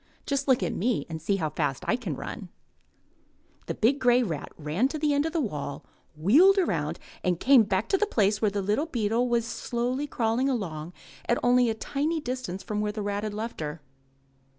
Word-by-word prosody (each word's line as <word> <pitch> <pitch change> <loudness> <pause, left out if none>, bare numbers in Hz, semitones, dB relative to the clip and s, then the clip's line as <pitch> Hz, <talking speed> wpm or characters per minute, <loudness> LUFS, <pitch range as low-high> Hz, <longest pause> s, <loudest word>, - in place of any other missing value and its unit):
Just 275 0 -1
look 255 -7 +3
at 180 - -1
me 215 - 0
and 160 -1 -5
see 195 +5 +1
how 160 -6 -2
fast 145 -5 -2
I - - +3
can 210 - -4
run." 190 - -7 1.2
The - - -2
big 260 +6 +2
grey 245 0 +4
rat 160 -10 -4
ran 160 - 0
to 310 - -4
the 300 -1 +1
end 285 +2 +2
of - - -4
the 335 - 0
wall, 150 - -4 0.3
wheeled 305 - +6
around, 375 - 0 0.3
and 180 -2 +1
came 265 -2 +6
back 205 0 0
to 390 - +2
the 425 - +2
place 210 - +1
where 215 - +3
the 200 0 -2
little 210 +11 0
beetle 235 -2 0
was 235 -1 +1
slowly 245 +4 -2
crawling 240 +1 0
along 175 - -3 0.4
at 240 - +3
only 245 -1 +4
a 220 - -1
tiny 295 +8 -1
distance 250 - -4
from 210 +1 -2
where 210 0 -1
the 210 0 -4
rat 205 0 -2
had 210 -1 -3
left 225 +2 -5
her. 150 +1 -4
225 Hz, 205 wpm, -27 LUFS, 190-260 Hz, 1.2 s, wheeled